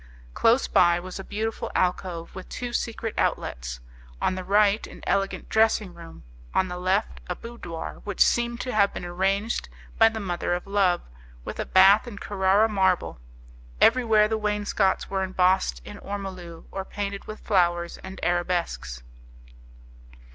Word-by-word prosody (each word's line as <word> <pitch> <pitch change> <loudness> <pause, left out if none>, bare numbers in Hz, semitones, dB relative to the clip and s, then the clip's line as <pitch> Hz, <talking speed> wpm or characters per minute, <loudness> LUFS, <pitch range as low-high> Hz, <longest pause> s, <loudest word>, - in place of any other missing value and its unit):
Close 235 - +3
by 175 -1 +4
was 185 +2 -8
a - - -5
beautiful 220 +3 -3
alcove 180 -2 -1
with 185 - -9
two 245 -1 -5
secret 225 -1 -2
outlets; - - -2 0.4
on - - +1
the 185 0 -5
right, 205 +2 +3
an - - -13
elegant 195 0 -1
dressing 220 -4 +2
room, 170 - -12 0.3
on 185 - +2
the 180 0 -5
left, 190 +4 0
a 180 - -1
boudoir 205 -9 -8
which 205 -2 -6
seemed 235 0 0
to 255 - -3
have 200 -2 +4
been - - -5
arranged 195 +5 -1 0.3
by 225 0 +8
the 225 0 -5
mother 175 -3 -1
of 175 - -5
Love, 195 -3 +2 0.4
with - - -6
a - - -2
bath 195 +5 +6
in 220 -4 -8
Carrara 200 +2 +2
marble. 190 - +1 0.6
Everywhere 225 -3 +5
the 220 0 -1
wainscots 210 -2 0
were 195 -1 -2
embossed 185 - +1
in - - -9
ormolu 185 -4 -7
or 195 - -4
painted 200 0 -5
with 215 - -8
flowers 175 -4 +1
and 190 0 -9
arabesques. 175 - -1
195 Hz, 155 wpm, -25 LUFS, 180-215 Hz, 0.6 s, by